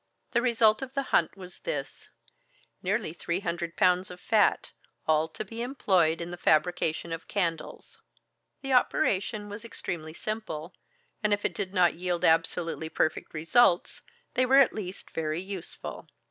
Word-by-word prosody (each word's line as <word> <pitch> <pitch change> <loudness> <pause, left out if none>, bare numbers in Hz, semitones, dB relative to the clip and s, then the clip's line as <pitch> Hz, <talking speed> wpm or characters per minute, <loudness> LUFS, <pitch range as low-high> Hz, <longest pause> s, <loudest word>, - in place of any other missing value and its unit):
The 235 - +2
result 230 -2 +4
of 265 +1 -7
the 275 - +1
hunt 170 +3 +3
was 180 -1 -10
this: - - -5 0.7
nearly 195 -2 -1
three 170 +1 -2
hundred 170 -2 -3
pounds 180 +1 +3
of 180 - -10
fat, 215 +2 +2 0.4
all 155 0 +3
to 160 - -7
be 225 +3 -7
employed 185 - +2
in 170 +1 -5
the 175 - -6
fabrication 165 0 +1
of 165 - -6
candles. 170 -6 -3 0.6
The 270 -1 -1
operation 210 -3 +1
was 205 +2 -8
extremely 160 -8 -5
simple, 200 -7 -5 0.5
and 210 -1 +2
if 205 - -8
it - - 0
did 185 - -4
not 180 -3 +4
yield 175 0 -1
absolutely 165 0 +1
perfect 155 0 -1
results, 175 +4 +3 0.3
they 255 - +2
were 260 +2 +5
at 275 -3 +6
least 195 -3 -7
very 155 0 -2
useful. 190 -3 -7
180 Hz, 155 wpm, -28 LUFS, 165-215 Hz, 0.7 s, at